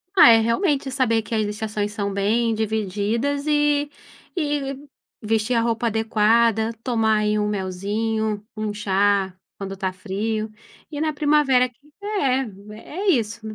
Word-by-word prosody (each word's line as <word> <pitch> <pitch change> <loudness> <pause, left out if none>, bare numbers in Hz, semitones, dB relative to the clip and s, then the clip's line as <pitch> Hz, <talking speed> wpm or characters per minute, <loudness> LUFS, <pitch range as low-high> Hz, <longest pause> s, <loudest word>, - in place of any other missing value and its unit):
Ah, 290 - +9
é 225 - +7
realmente 270 - +1
saber 230 -4 +2
que 225 +1 -5
estações 210 0 -2
são 200 -2 -3
bem 225 +4 +1
divididas 220 +6 -1
e 295 -1 +2 0.5
e 290 -2 -3 0.3
vestir 225 +2 0
a 230 - +3
roupa 230 0 0
adequada, 225 0 +2
tomar 225 -3 +2
aí 210 0 +1
um 210 - 0
melzinho, 210 +2 -2
um 215 -1 -3
chá, 200 -2 +1 0.2
quando 195 -1 -6
tá 190 -1 -2
frio, 215 +3 -3 0.4
e 295 0 -4
na 315 - +1
primavera, 290 -4 +3
que 245 - -23 0.3
é 270 - 0 0.3
é 375 - -6
isso, 230 - +1
225 Hz, 135 wpm, -22 LUFS, 210-265 Hz, 0.5 s, Ah